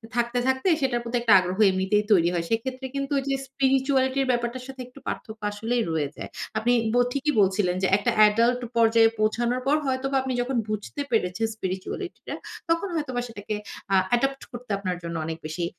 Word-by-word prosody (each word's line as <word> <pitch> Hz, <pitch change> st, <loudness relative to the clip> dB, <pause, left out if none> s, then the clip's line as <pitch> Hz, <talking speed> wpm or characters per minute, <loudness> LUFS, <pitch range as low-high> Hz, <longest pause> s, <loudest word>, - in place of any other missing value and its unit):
থাকতে, 240 Hz, 0 st, 0 dB
থাকতে 260 Hz, +5 st, +1 dB
সেটার 250 Hz, -3 st, +1 dB
প্রতি 235 Hz, +1 st, -4 dB
একটা 230 Hz, -3 st, +5 dB
আগ্রহ 185 Hz, 0 st, -3 dB
এমনিতেই 190 Hz, +3 st, +1 dB
তৈরি 175 Hz, -4 st, +5 dB
হয়। 170 Hz, -1 st, -1 dB
সেক্ষেত্রে 255 Hz, +4 st, -2 dB
কিন্তু 275 Hz, 0 st, -3 dB
ওইযে 275 Hz, 0 st, -1 dB
স্পিরিচুয়ালিটি 265 Hz, 0 st, +1 dB
এর -, -, -3 dB
ব্যাপারটার 240 Hz, +1 st, -2 dB
সাথে 265 Hz, -1 st, -8 dB
একটু 255 Hz, +2 st, -15 dB
পার্থক্য 220 Hz, 0 st, -5 dB
আসলেই 225 Hz, +4 st, -1 dB
রয়ে 155 Hz, -3 st, 0 dB
যায়। -, -, -7 dB, 0.3 s
আপনি 240 Hz, +2 st, +2 dB, 0.2 s
ব -, -, +1 dB, 0.2 s
ঠিকই 280 Hz, +3 st, 0 dB
বলছিলেন 190 Hz, -2 st, +2 dB
যে, -, -, +4 dB
একটা 205 Hz, -, 0 dB, 0.2 s
এডাল্ট 235 Hz, +4 st, +2 dB, 0.2 s
পর্যায়ে 225 Hz, 0 st, +5 dB
পৌঁছানোর 235 Hz, +3 st, +1 dB
পর 285 Hz, -, +4 dB
হয়তোবা 270 Hz, +1 st, -1 dB
আপনি 260 Hz, 0 st, -3 dB
যখন 250 Hz, +1 st, -1 dB
বুঝতে 215 Hz, +6 st, -4 dB
পেরেছেন, 220 Hz, -1 st, +1 dB
স্পিরিচুয়ালিটিটা 190 Hz, -, -5 dB, 0.3 s
তখন 335 Hz, +4 st, +1 dB
হয়তোবা 260 Hz, -6 st, -2 dB
সেটাকে 215 Hz, -2 st, -5 dB, 0.4 s
আ -, -, +6 dB, 0.2 s
অ্যাডপ্ট 270 Hz, +3 st, +1 dB
করতে 240 Hz, -2 st, -8 dB
আপনার 185 Hz, -2 st, -3 dB
জন্য 170 Hz, 0 st, -5 dB
অনেক 160 Hz, 0 st, -4 dB
বেশি 160 Hz, +3 st, -3 dB
240 Hz, 180 wpm, -25 LUFS, 205-265 Hz, 0.4 s, আ